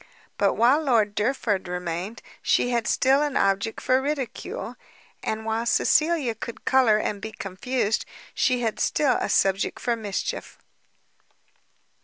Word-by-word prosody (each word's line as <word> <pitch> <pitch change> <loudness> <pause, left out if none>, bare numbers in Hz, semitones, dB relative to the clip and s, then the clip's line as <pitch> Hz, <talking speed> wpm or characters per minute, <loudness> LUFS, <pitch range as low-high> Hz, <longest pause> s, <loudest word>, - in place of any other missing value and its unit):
But 200 - +3
while 250 +7 +4
Lord 230 -8 +2
Derford 210 -4 0
remained, 180 +4 -4 0.2
she 245 - +2
had 235 -1 0
still 270 +2 +3
an 295 -2 0
object 195 +3 +1
for 255 +1 +2
ridicule, 270 -4 -4 0.5
and 220 0 -3
while 225 +1 -1
Cecilia 305 -2 +2
could 230 +1 -8
colour 255 -5 +4
and 205 -1 -2
be 220 - -5
confused, 210 +3 -2 0.3
she 250 -2 +1
had 225 -2 -2
still 285 -4 +2
a - - -2
subject 195 0 +1
for 240 -1 0
mischief. 210 -4 -4
225 Hz, 135 wpm, -25 LUFS, 205-260 Hz, 0.5 s, while